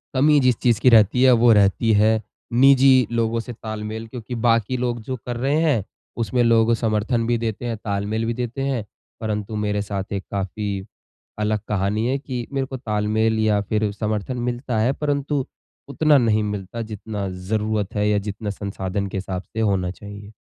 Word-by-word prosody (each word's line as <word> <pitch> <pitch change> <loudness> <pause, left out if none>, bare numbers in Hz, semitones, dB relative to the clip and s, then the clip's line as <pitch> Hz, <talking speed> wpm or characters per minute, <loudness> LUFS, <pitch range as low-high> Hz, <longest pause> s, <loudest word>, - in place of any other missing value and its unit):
कमी 145 +2 +5
जिस 125 -3 +3
चीज़ 120 -4 +2
की 125 - +6
रहती 115 +2 +5
है 130 - +7
वो 120 - +7
रहती 105 +3 +3
है 110 +1 +3 0.4
निजी 135 0 +7 0.2
लोगों 115 0 0
से 120 +1 -6
तालमेल 110 0 -6
क्योंकि 120 0 -7
बाकी 115 +2 +2
लोग 120 -2 -2
जो 130 +3 -4
कर 120 -1 -3
रहे 135 +4 +1
हैं, 140 - +2 0.3
उसमें 120 +2 0
लोग 115 0 +4
समर्थन 115 +1 0
भी 120 -1 +2
देते 115 +1 -3
हैं, 115 -2 -2
तालमेल 105 +2 -2
भी 115 - -1
देते 125 +2 -4
हैं 120 -6 -2 0.4
परंतु 105 0 -3
मेरे 105 0 0
साथ 100 0 -4
एक 100 -2 -3
काफ़ी 100 0 -3 0.5
अलग 105 0 0
कहानी 105 +2 0
है 135 +2 +1
कि, 125 -4 -5
मेरे 135 -1 0
को 130 - -6
तालमेल 110 -1 0
या 105 -1 +2
फिर 105 0 -1
समर्थन 110 +3 -3
मिलता 120 -2 -2
है, 125 +5 +2
परंतु 145 -2 -1 0.4
उतना 150 0 +4
नहीं 110 -3 +2
मिलता 105 +2 -4
जितना 105 -2 -5
ज़रूरत 105 +2 -2
है 105 0 +1
या 105 - +2
जितना 105 +1 -5
संसाधन 100 0 -3
के 95 - -5
हिसाब 95 -1 -4
से 110 - -3
होना 95 -4 +1
चाहिए। 100 +1 -10
110 Hz, 180 wpm, -22 LUFS, 105-120 Hz, 0.5 s, है